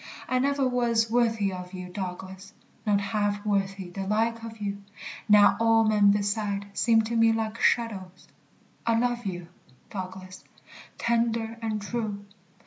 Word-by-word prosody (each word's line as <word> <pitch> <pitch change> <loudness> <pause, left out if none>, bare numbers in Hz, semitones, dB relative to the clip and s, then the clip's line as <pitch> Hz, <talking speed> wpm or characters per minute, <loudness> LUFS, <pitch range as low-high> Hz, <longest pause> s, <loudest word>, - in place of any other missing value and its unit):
I 255 - +1
never 280 0 +1
was 235 -3 +1
worthy 225 -5 +2
of 180 0 -8
you, 180 0 -6
Douglas; 190 +1 -7 0.3
Not 205 -1 +3
half 205 0 -1
worthy 195 -3 -1
the 195 +1 -5
like 225 +2 0
of 225 -1 -8
you: 200 -1 -4 0.5
Now 205 -1 +7
all 225 0 +4
men 210 -2 +4
beside 205 0 0
seem 225 -2 +4
to 230 +2 -3
me 225 0 +5
like 225 0 -2
shadows 190 -6 0 0.6
I 230 -1 +2
love 240 -1 0
you, 175 -2 -5 0.4
Douglas, 185 -1 -7 0.5
tender 230 -1 0
and 220 -2 -2
true. 210 -2 -4
210 Hz, 140 wpm, -27 LUFS, 195-230 Hz, 0.6 s, Now